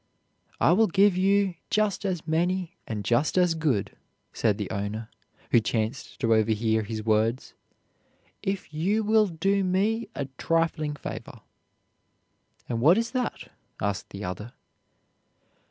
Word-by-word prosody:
"I - - +5
will 215 +5 +5
give 200 +1 +4
you 195 0 +3 0.2
just 210 -1 +1
as 180 -4 -2
many 175 +2 0
and 105 -3 -4
just 120 - +2
as 180 -2 +4
good," 130 -12 -1 0.4
said - - +1
the - - -4
owner, 105 +3 -4 0.4
who 120 - +6
chanced 115 +4 -3
to 115 -1 +3
overhear 110 0 +2
his 110 0 -5
words, 110 +3 +1 0.9
"if 195 -5 -3
you 195 +8 +1
will 215 0 +4
do 195 +4 +1
me 205 +5 0
a 140 - -2
trifling 165 -2 0
favor." - - -8 1.3
"And 115 -1 -2
what 165 - +6
is 230 +1 -1
that?" 255 -2 -3 0.3
asked 100 -1 -2
the 100 +1 -8
other. 105 +6 -6
160 Hz, 135 wpm, -27 LUFS, -, 1.3 s, who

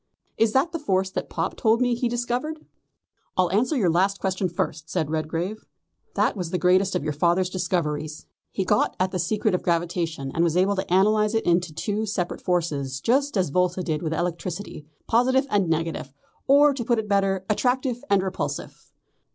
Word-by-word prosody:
Is 225 -1 +2
that 275 +6 +2
the 330 - -3
force 190 -9 0
that - - -4
Pop 165 +2 -2
told 225 +1 +2
me 250 -1 +2
he 240 0 -1
discovered?" 245 +6 -3 0.7
"I'll 180 -2 +3
answer 250 +8 +1
the 195 - +2
last 190 +4 +2
question 190 -1 -1
first," 160 -2 -3
said 155 -1 -1
Redgrave. 165 +6 -3 0.5
"That - - +2
was 180 -5 -4
the 180 - -1
greatest 185 +2 +3
of - - -1
your 150 0 -2
father's 175 +4 +1
discoveries. 155 -5 -2 0.2
He 190 - -2
got - - +2
at 185 0 +1
the 185 - -2
secret 210 +4 0
of 180 - 0
gravitation, 165 -4 -1
and 165 - +1
was 170 0 +1
able 195 +2 +3
to 190 - -3
analyse 210 +3 +3
it 225 - 0
into 175 -1 +2
two 210 +7 -2
separate 185 -4 -3
forces 145 -7 -1
just 270 - +1
as 180 -6 +1
Volta 180 +2 +1
did 155 -3 -2
with 160 - -2
electricity 170 0 -4 0.2
positive 260 +3 +3
and 195 -4 +2
negative, 160 -4 -2 0.4
or, 285 +1 +6
to 260 -3 -4
put 235 +1 +1
it 220 -1 -2
better, 195 -2 +1
attractive 250 +2 0
and 200 -2 +3
repulsive. 190 -1 -5
185 Hz, 185 wpm, -24 LUFS, 170-220 Hz, 0.7 s, or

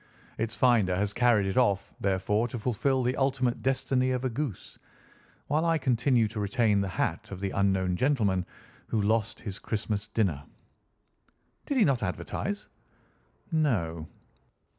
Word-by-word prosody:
Its 115 0 -1
finder 110 -8 +3
has 100 +2 0
carried 120 -4 +3
it 95 +6 +1
off, 100 -6 +1
therefore, 100 +4 +1
to 120 - -5
fulfil 125 +3 0
the 125 +1 0
ultimate 130 -3 0
destiny 130 0 +1
of 130 0 -1
a 130 - 0
goose, 135 - -5 0.7
while 150 +3 +1
I 165 -1 +2
continue 125 -3 +2
to 110 0 -6
retain 105 -1 +2
the 100 - -1
hat 95 - -2
of 95 - -7
the 100 0 -2
unknown 95 -2 +1
gentleman 105 -9 +1 0.4
who 110 - 0
lost 110 +1 0
his 100 -4 -6
Christmas 105 -1 -3
dinner." 90 -11 0 1.2
"Did 285 - 0
he 225 - +5
not 135 -6 +1
advertise?" 205 0 -3 0.8
"No." 90 - 0
115 Hz, 145 wpm, -28 LUFS, 100-130 Hz, 1.2 s, he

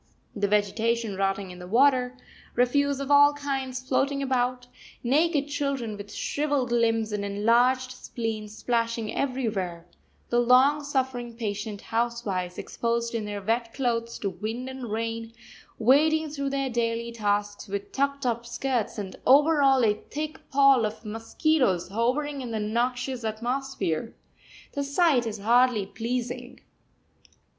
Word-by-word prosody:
The 205 -1 +1
vegetation 210 +2 +1
rotting 195 0 -1
in 180 - -11
the 180 - -9
water, 255 +3 +3 0.4
refuse 280 +3 +2
of 275 0 -3
all 285 0 +7
kinds 265 -2 -3
floating 275 +1 +1
about, 250 -1 0 0.4
naked 290 +3 +2
children 275 -6 -2
with 205 0 -9
shrivelled 285 -1 -1
limbs 225 -2 +2
and 210 -1 -2
enlarged 240 +6 +2
spleens 220 -4 -5
splashing 230 -2 -1
everywhere, 210 -11 -2 0.4
the 240 - +3
long 260 +5 +5
suffering 260 -4 -2
patient 205 -2 -4
housewives 225 -6 -2
exposed 235 0 -2
in 225 -2 -2
their 205 -1 -5
wet 230 +2 -1
clothes 235 -3 -1
to 200 - -2
wind 225 +6 -5
and 260 -3 -6
rain, 225 +1 -3 0.4
wading 305 +6 +3
through 280 -2 -2
their 275 -1 -1
daily 235 0 -1
tasks 205 -2 -1
with 200 0 -5
tucked 280 0 -1
up 235 -1 0
skirts, 240 -1 -2
and 195 -3 -6
over 295 +3 +6
all 270 -3 +5
a 210 - +4
thick 300 +8 -7
pall 275 -3 +5
of 215 +1 -4
mosquitoes 225 - 0
hovering 265 +7 -1
in 250 - -5
the 225 -1 -2
noxious 245 +3 -1
atmosphere 225 -5 -2 0.6
the 285 - -1
sight 280 -4 +2
is 220 -1 -4
hardly 235 0 +3
pleasing! 245 +3 -4
240 Hz, 135 wpm, -26 LUFS, 220-270 Hz, 0.6 s, all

